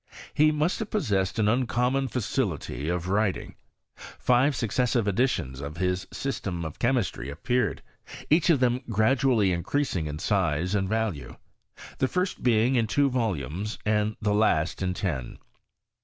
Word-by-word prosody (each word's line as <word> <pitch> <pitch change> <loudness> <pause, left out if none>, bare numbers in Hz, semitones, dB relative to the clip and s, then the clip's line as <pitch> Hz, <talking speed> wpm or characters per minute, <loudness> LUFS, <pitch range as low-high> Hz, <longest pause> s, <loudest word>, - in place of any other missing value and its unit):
He 155 +1 +4
muit 155 +4 0
have 220 - -4
possessed 100 - 0
an 110 -2 +2
uncommon 125 +3 +1
facility 100 - -2
of 90 -1 -1
wrttia^. 100 +1 0 0.4
Five 130 +3 +1
successive 115 0 0
editions 95 - 0
of 70 +3 -6
his 90 0 -1
System 95 -11 -3
of 80 - -7
Cbemisti; 120 - 0
appeared, 120 - -1 0.4
each 160 +3 +3
of 160 -5 +5
them 125 0 +2
gradually 115 -1 +3
increasing 90 - -1
in 75 0 -5
siae 90 -1 0
and 95 -2 0
value: 110 -8 -2 0.6
the 130 - +2
first 180 +5 -2
being 120 +1 +3
in 115 -3 +2
two 140 +4 +2
volumes 105 - -2
and 105 0 +1
th« 105 -1 +2
last 90 -7 +1
in 90 -1 -1
ten. 75 -12 -3
110 Hz, 140 wpm, -26 LUFS, 90-125 Hz, 0.6 s, of